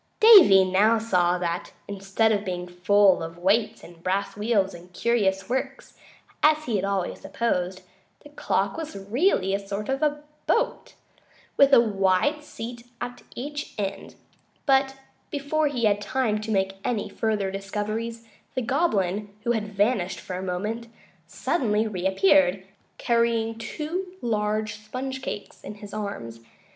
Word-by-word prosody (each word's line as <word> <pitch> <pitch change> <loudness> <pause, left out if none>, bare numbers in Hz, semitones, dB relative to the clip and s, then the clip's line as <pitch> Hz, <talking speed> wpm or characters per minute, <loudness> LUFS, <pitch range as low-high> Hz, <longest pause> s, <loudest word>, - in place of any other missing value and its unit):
Davy 365 - +9
now 205 +5 +4
saw 180 -5 +2
that, 175 -1 -3
instead 200 +2 0
of 205 -1 +1
being 180 -2 -4
full 190 +2 +3
of 165 +1 -6
weights 210 +5 +1
and 170 -1 -14
brass 190 +3 -1
wheels 205 -2 +1
and 175 +1 -13
curious 195 -3 +1
works, 265 - -4 0.5
as 305 0 +4
he 230 -4 0
had 190 - -2
always 195 -2 -2
supposed, 185 -5 -2 0.4
the - - -14
clock - - -1
was 315 -9 -6
really 200 - +1
a 200 - +1
sort 200 +2 -5
of 295 +2 0 0.2
boat, 485 +2 0 0.6
with 280 0 +5
a 275 - +8
wide 210 +7 +1
seat 240 -3 -8
at 245 0 -6
each 290 +4 -6
end; 195 -1 -4 0.5
but, 270 -1 +3 0.3
before 295 +2 0
he 260 -5 -2
had 205 -1 +2
time 220 -2 0
to 220 - -6
make 195 -2 0
any 220 -4 -1
further 205 -1 -1
discoveries, 215 +4 -4 0.3
the 255 - -1
Goblin, 210 - 0
who 240 - +1
had 220 -3 -1
vanished 200 -3 +1
for 180 - -6
a 185 - -4
moment, 210 +6 -3 0.4
suddenly 220 -9 0
reappeared, 190 -1 +2 0.3
carrying 230 -1 +1
two 320 +11 -5
large 215 - -1
sponge 260 +4 -5
cakes 205 -5 -7
in 210 - -7
his 205 -1 -11
arms. 200 - -5
210 Hz, 145 wpm, -25 LUFS, 195-245 Hz, 0.6 s, Davy